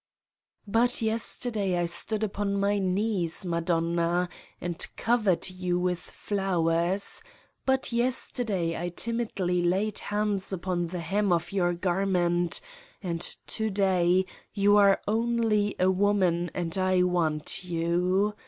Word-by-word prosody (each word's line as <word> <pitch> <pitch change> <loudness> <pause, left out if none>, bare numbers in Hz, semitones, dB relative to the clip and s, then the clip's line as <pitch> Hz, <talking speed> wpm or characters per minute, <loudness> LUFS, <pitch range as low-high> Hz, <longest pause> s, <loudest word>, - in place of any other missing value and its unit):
But 230 +3 +2
yesterday 220 -3 0
I 175 - +1
stood 210 +5 -1
upon 200 -1 -1
my 200 +1 +1
knees, 190 -2 0
Madonna, 170 +1 0 0.3
and 175 -1 -3
covered 220 -6 +2
you 180 -1 -1
with 180 -1 0
flowers: 185 -1 0 0.5
but 265 -1 +1
yesterday 235 -7 0
I 175 - -2
timidly 195 -3 -1
laid 190 +4 0
hands 205 -2 -1
upon 175 -2 -2
the 175 +1 -5
hem 195 +4 0
of 170 +2 0
your 175 -3 +1
garment, 175 - 0 0.4
and 170 -2 -2 0.2
to 220 -1 -1
day 185 -2 +2 0.3
you 205 0 +4
are 200 -1 +5
only 220 -2 +1
a 185 +1 +3
woman 185 -3 +2
and 170 -2 -2
I 185 -1 +3
want 165 -3 -1
you. 180 +4 +1
185 Hz, 120 wpm, -27 LUFS, 175-205 Hz, 0.5 s, are